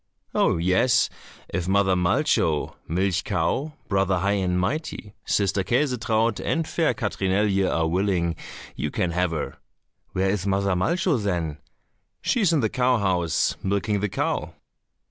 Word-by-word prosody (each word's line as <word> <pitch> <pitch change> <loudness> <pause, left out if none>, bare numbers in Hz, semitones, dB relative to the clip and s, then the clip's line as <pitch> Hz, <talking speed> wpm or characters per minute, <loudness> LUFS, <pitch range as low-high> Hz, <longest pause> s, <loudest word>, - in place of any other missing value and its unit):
"Oh, - - +2
yes, 95 +9 +3 0.4
if 85 0 -2
Mother 95 0 +3
Malcho 85 -3 +1
(Milch 90 +2 0
cow), 150 +3 -1
Brother 95 -2 +1
High 100 +3 +1
and 90 -1 0
Mighty, 110 - -3
Sister 100 -1 +1
Käsetraut, 115 -3 +1
and 165 -1 0
fair 165 -2 +1
Katrinelje 100 -2 +1
are 80 -1 +1
willing, 90 -1 0 0.4
you - - -2
can 90 - -1
have 90 +1 +1
her." 80 -3 -4 0.6
"Where 95 +1 +1
is 100 -1 -2
Mother 100 0 +1
Malcho, 165 - +1
then?" 85 -6 -2 0.6
"She 240 - +1
is 190 -5 +4
in 160 -4 +2
the 110 - +2
cow 125 +1 +2
house, 90 -6 +1
milking 100 +2 0
the 105 +1 -1
cow." - - -2
95 Hz, 145 wpm, -24 LUFS, 90-115 Hz, 0.6 s, is